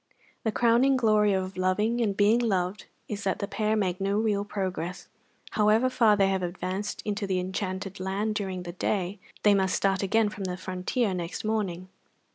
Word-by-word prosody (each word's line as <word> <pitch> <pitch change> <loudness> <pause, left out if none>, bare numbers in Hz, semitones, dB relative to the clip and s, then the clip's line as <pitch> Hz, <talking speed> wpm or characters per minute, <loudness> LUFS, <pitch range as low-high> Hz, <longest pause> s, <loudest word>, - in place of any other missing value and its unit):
The 220 - +1
crowning 240 +4 +4
glory 215 -3 +3
of 190 0 -2
loving 210 +6 +1
and 200 -4 0
being 210 +3 +4
loved 195 -4 -1 0.2
is 205 -1 -5
that 190 - 0
the 200 - -3
pair 215 +1 0
make 190 -3 -1
no 200 +1 +1
real 210 -2 +1
progress; 185 -3 -4 0.4
however 220 +4 +3
far 225 -5 +4
they 195 -1 +4
have 190 -1 0
advanced 185 +3 -4
into 205 -1 -2
the 185 -1 0
enchanted 190 +1 -4
land 195 +3 -1
during 190 -4 -3
the 175 - -6
day, 190 +1 -1 0.2
they 210 - +6
must 190 -2 +2
start 195 -1 +1
again 210 +2 +2
from 205 -2 -6
the 180 -1 -3
frontier 185 +4 -1
next 170 -2 -4
morning. 195 -5 -2
200 Hz, 180 wpm, -27 LUFS, 185-215 Hz, 0.4 s, they